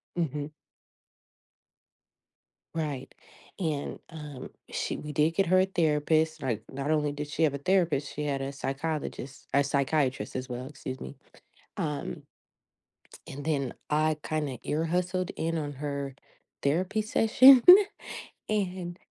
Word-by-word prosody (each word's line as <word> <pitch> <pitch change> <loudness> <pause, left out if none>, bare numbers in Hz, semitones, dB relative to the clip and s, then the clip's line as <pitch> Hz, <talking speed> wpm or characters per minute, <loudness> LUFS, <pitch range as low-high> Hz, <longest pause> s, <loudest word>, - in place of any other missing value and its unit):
Mhm. 150 -3 -2 2.3
Right, 150 -5 -3 0.5
and, 155 -5 -2
um, 150 -4 -8 0.2
she - - -2
we 150 - -6
did 150 +2 +3
get 195 +2 +2
her 185 +2 +5
a 190 - +3
therapist, 160 -2 +1
like, 115 -5 -2
not 140 +3 -2
only 150 -1 +2
did 145 0 -5
she 155 +2 -1
have 145 -3 +3
a - - -2
therapist, 160 -3 +1
she 150 - -3
had 140 -2 -1
a 135 +1 -3
psychologist 140 -1 -4
a 140 0 +5
psychiatrist 140 -1 0
as 130 0 -3
well, 125 +1 -5
excuse 130 -3 -7
me. - - -7 0.6
Um 150 -7 -3 1.1
and 145 +2 -7
then, 140 -5 0 0.2
I 155 0 +2
kinda 150 -6 -2
ear-hustled 180 +4 -1
in 165 0 -1
on 145 -2 -3
her 140 -1 -4 0.5
therapy 185 +9 +1
session, 245 +4 +7 0.9
and, 185 -4 -2
150 Hz, 130 wpm, -29 LUFS, 140-165 Hz, 2.3 s, session